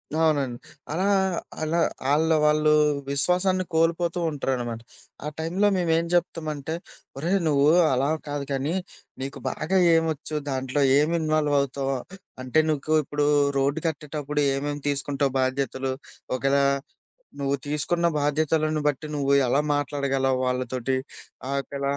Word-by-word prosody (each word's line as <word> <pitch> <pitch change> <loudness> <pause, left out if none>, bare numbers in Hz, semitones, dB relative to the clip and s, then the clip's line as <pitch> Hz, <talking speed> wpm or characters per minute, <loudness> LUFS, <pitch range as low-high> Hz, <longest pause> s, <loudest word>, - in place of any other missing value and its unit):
అవునండి. 145 -6 +1 0.3
అలా, 180 +5 0 0.5
అలా 160 +2 0 0.3
ఆళ్ళ 160 +2 +3
వాళ్ళు 150 0 +4 0.4
విశ్వాసాన్ని 180 +6 +1
కోల్పోతూ 170 +2 +1
ఉంటారనమాట. 125 -5 -2 0.5
ఆ - - -2
టైంలో 180 +6 +1
మేమెం 165 -1 +1
చెప్తామంటే, 160 -3 -2 0.4
"ఒరేయ్! 175 +7 +1
నువ్వు 145 -1 +3 0.3
అలా 135 +3 +1 0.2
కాదు 145 -1 -3
కానీ, 140 +5 -1 0.5
నీకు 135 +1 -5
బాగా 180 +5 -1 0.2
ఏమొచ్చు 160 -2 -1
దాంట్లో 130 +1 0 0.2
ఏమి 155 +3 +2
ఇన్వాల్వ్ 155 -2 +1
అవుతావు 135 0 -2 0.5
అంటే, 130 +5 +2
నీకు 155 0 -1
ఇప్పుడు 145 +1 -1 0.3
రోడ్డు 140 +3 +1
కట్టేటప్పుడు 150 -1 -3
ఏమేమి 145 +1 -3
తీసుకుంటావు 140 -1 -1
బాధ్యతలు? 130 0 -1 0.4
ఒకేళ 135 +2 +2 0.8
నువ్వు 140 0 0
తీసుకున్న 160 +4 0
బాధ్యతలను 155 +1 +1
బట్టి 145 +2 -4
నువ్వు 140 -1 0 0.2
ఎలా 140 +3 +3
మాట్లాడగలవు 135 -2 0
వాళ్ళతోటి," 125 +1 -1 0.6
ఆకల 140 0 -3
145 Hz, 115 wpm, -25 LUFS, 135-160 Hz, 0.8 s, వాళ్ళు